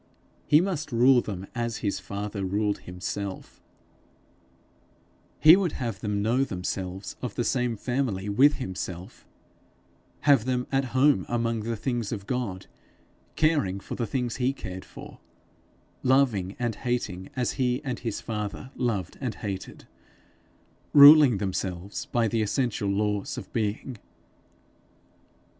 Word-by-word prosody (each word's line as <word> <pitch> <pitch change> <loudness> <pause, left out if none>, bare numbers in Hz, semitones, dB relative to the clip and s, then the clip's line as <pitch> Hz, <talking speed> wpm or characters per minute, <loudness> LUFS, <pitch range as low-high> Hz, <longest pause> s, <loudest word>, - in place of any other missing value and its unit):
He 150 +2 +6
must 175 -6 -3
rule 125 +2 +5
them 95 -4 -6
as 120 -2 -2
his 100 - 0
father 100 +2 -5
ruled 100 +2 0
himself; 95 +2 -6 1.8
he 155 +2 +9
would 185 -4 0
have 115 -6 -4
them 105 -1 -2
know 120 +5 +2
themselves 95 -2 -4
of 125 -5 -5
the 120 - 0
same 125 -2 0
family 120 -6 -2
with 130 +9 +4
himself; 95 -6 -6 0.9
have 140 -6 +4
them 125 -1 0
at 135 0 +1
home 130 -3 +3
among 115 -1 0
the 115 +2 -3
things 120 -2 -2
of 100 - -5
God, 105 -6 -3 0.7
caring 145 - +1
for - - -8
the 115 - -2
things 125 -1 -2
he 130 +1 +1
cared 95 -7 -8
for, - - -12 0.8
loving 125 -8 +2
and 120 -2 -1
hating 105 -7 -3
as 125 -2 0
he 125 0 +1
and 130 -5 -3
his 115 -4 -4
father 105 +3 -5
loved 105 -8 -2
and 125 -4 -3
hated, 100 -3 -6 1.1
ruling 145 -4 +9
themselves 95 -1 -4
by 120 -2 +1
the 115 +1 0
essential 105 -1 -1
laws 105 0 -1
of - - -9
being. 110 +2 -2
115 Hz, 130 wpm, -26 LUFS, 100-130 Hz, 1.8 s, he